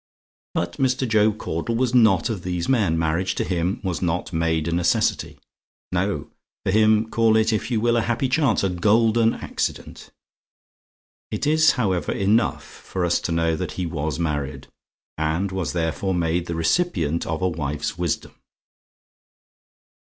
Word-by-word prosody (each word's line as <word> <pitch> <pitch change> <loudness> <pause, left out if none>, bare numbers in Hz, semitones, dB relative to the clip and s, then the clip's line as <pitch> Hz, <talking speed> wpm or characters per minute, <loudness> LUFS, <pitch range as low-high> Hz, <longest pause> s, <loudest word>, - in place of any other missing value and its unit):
But 85 0 -2
Mr. 130 0 +1
Job 110 -1 +3
Caudle 85 +8 -3
was 125 +1 0
not 110 -5 +4
of 100 -5 -4
these 90 -1 -3
men. 105 -11 +2
Marriage 85 +4 0
to - - -1
him 90 +1 -1
was 90 -3 -2
not 90 0 -2
made 80 -1 0
a - - -1
necessity. 85 0 0 0.5
No; - - -2 0.3
for - - +1
him 110 +1 +4
call 115 -1 +3
it 110 +1 +2
if 110 - -2
you 115 -3 +1
will 120 +1 +2
a 115 - +3
happy 120 +4 0
chance 130 -5 +2
a 95 - +2
golden 110 +5 +3
accident. - - -4 1.2
It 105 - -3
is, 155 +1 +4
however, 95 - 0
enough 105 +4 +1
for 90 -2 -5
us 85 - +2
to - - -4
know 80 0 +1
that - - -4
he 90 - -3
was 80 -2 -3
married; 75 -5 -3 0.5
and 80 +5 0
was 95 -3 -3
therefore 85 +3 -1
made 85 0 0
the 85 - -3
recipient 85 - 0
of 80 +2 -2
a - - +3
wife's 75 -3 -3
wisdom. 85 -3 -3
95 Hz, 160 wpm, -23 LUFS, 85-110 Hz, 1.2 s, not